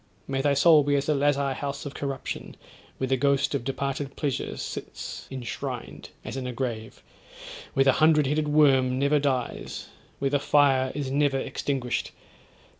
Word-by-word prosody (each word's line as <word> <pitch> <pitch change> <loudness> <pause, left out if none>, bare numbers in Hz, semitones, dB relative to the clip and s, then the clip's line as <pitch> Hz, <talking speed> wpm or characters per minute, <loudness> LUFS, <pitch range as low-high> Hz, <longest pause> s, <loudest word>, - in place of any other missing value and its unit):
May 135 0 -1
thy 140 0 +2
soul 155 +2 +6
be 145 0 +1
as 140 - +1
the 155 - +2
lazar 140 -1 +1
house 140 +1 -5
of 145 - -5
corruption, 135 -2 -5 0.4
where 130 - -1
the 130 +1 +2
ghost 140 +2 +2
of 140 - -1
departed 135 +1 -3
pleasure 140 -4 -2
sits - - -6
enshrined, 130 -3 -6 0.2
as - - -5
in 130 -1 -4
a - - -3
grave: 115 -3 -5 0.7
where 135 - +5
the 135 - +5
hundred 155 +1 +4
headed 150 +2 0
worm 135 -4 +4
never 140 +2 +3
dies 130 -4 -2 0.3
where 135 -1 -1
the 145 - +2
fire 135 -2 +3
is 140 -3 -3
never 140 -1 +2
extinguished. 130 -2 -2
140 Hz, 165 wpm, -26 LUFS, 130-145 Hz, 0.7 s, soul